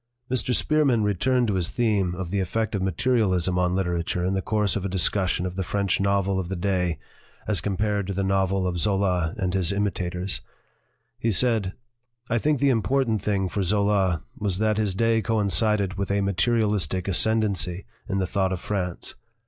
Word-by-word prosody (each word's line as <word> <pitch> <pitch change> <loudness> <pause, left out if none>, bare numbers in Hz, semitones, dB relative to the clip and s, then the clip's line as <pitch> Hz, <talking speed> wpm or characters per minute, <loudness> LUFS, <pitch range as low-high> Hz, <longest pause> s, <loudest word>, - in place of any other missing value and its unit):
Mr. 125 -1 0
Spearman 140 -7 +2
returned 120 +5 +1
to 105 - 0
his 90 -3 -1
theme 105 -7 0
of 90 -1 -5
the 100 - 0
effect 110 +5 -1
of 100 - -1
materialism 95 -4 +1
on 90 0 +1
literature 90 -1 -1
in 95 - 0
the 95 - 0
course 105 -1 0
of 100 - -2
a 100 - -2
discussion 90 -1 +1
of 90 -1 -4
the 95 - -2
French 100 +1 0
novel 100 -1 +1
of 90 -2 -4
the 95 - -2
day 90 -2 0 0.5
as 100 -6 +1
compared 100 +1 -1
to 100 - -2
the 100 +1 -1
novel 95 0 +1
of 90 -1 -1
Zola 95 -2 +1
and 95 -4 -1
his 95 -2 +1
imitators. 95 -2 -2 0.8
He 115 - +1
said: 110 -3 +1 0.6
"I 120 - +2
think 150 +2 +1
the 140 - +3
important 120 -1 +1
thing 100 -2 0
for 100 - -2
Zola 95 -2 +1 0.2
was 100 -5 0
that 110 0 +1
his 100 -4 0
day 115 +2 +2
coincided 105 -2 +1
with 100 - -2
a 100 0 +1
materialistic 100 -3 0
ascendency 95 -3 +1 0.2
in 100 - 0
the 95 - +1
thought 95 0 0
of 95 - -2
France. 90 -3 -4
100 Hz, 180 wpm, -25 LUFS, 90-105 Hz, 0.8 s, the